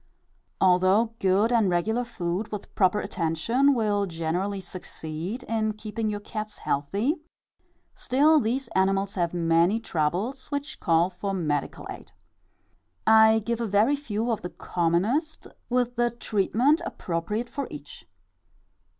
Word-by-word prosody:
Although 190 +5 +4
good 195 +4 +3
and 225 -5 +3
regular 220 +8 +1
food, 190 -3 -3
with 210 -2 -7
proper 195 +1 +2
attention, 230 - +1
will 205 -3 +1
generally 175 +4 -2
succeed 180 +3 -6
in 220 -1 -1
keeping 215 +1 -4
your 205 -1 -3
cats 215 0 -6
healthy, 200 - -1 0.8
still 300 +5 +3
these 255 +2 -1
animals 195 +1 +1
have 175 -4 0
many 170 +4 +2
troubles 200 - -2
which 285 0 -4
call 170 +2 +2
for 195 +2 -3
medical 150 -5 -2
aid. - - -10 0.9
I 220 0 +6
give 235 0 -1
a 230 - -1
very 210 +8 +3
few 235 -4 -2
of 225 - -1
the 180 - -5
commonest, 195 - -1 0.2
with 245 -1 +1
the 240 0 +3
treatment 235 - +1
appropriate 190 +7 -3
for 280 0 -4
each. 145 -1 -10
210 Hz, 130 wpm, -26 LUFS, 180-235 Hz, 0.9 s, I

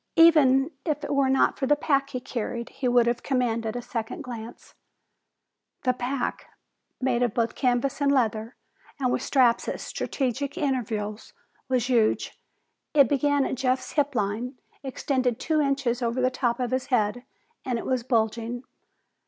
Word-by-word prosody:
Even 305 -4 +6
if 300 -2 -2
it 290 - -2
were 275 -1 +3
not 265 - +2
for 270 - 0
the 295 - +5
pack 280 -2 +1
he 255 - -4
carried, 235 -2 -4
he 260 - -3
would 245 -1 +4
have 235 0 0
commanded 230 -4 -1
a 245 - -4
second 235 +8 -4
glance. 235 -3 -9 1.1
The 255 - +3
pack, 250 +1 -3 0.5
made 255 -2 +1
of 240 -4 +1
both 230 -1 +1
canvas 255 +2 0
and 280 -1 +3
leather 225 -3 0 0.4
and 255 -2 +1
with - - 0
straps 250 -4 +3
at - - -3
strategic 275 +3 -3
intervals, 225 - -2 0.4
was 250 -2 +1
huge. 235 -4 +1 0.6
It 280 -5 +6
began 285 0 +2
at - - -2
Jeff's 255 0 -1
hip 285 -2 0
line, 220 +5 -1 0.3
extended 260 -3 -1
two 310 -1 +1
inches 275 -4 0
over 235 +1 -1
the 255 0 +2
top 245 -2 0
of 250 -1 -1
his 260 0 -1
head, 240 -1 +1 0.4
and 250 -2 -1
it - - -5
was 255 -2 0
bulging. 235 0 -1
255 Hz, 160 wpm, -26 LUFS, 235-275 Hz, 1.1 s, Even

